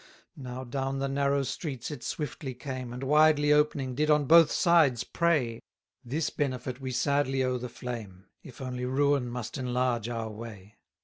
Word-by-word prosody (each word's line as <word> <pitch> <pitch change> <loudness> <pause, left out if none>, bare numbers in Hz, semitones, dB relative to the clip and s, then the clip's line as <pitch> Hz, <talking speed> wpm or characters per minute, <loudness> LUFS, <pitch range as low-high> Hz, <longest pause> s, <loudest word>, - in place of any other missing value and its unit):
277 140 - -10
Now 125 +1 -6 0.3
down 135 - -3
the 135 0 -1
narrow 140 0 +1
streets 130 0 -4
it 145 -5 -7
swiftly 140 -3 -4
came, 130 -2 -6
And 125 +2 -6
widely 150 +1 +4
opening 150 -3 +1
did 150 +4 0
on 150 -1 +4
both 165 +2 +7
sides 160 -9 +4
prey: 145 -10 0 0.4
This 145 +6 -2
benefit 130 -2 -3
we 130 - -4
sadly 135 +1 +1
owe 130 -1 0
the 125 0 -5
flame, 110 -7 -7 0.2
If 130 0 -12
only 125 -1 -4
ruin 135 -1 +1
must 125 +3 -5
enlarge 125 -2 0
our 115 -2 -4
way. 105 -2 -10
130 Hz, 170 wpm, -28 LUFS, 125-145 Hz, 0.4 s, both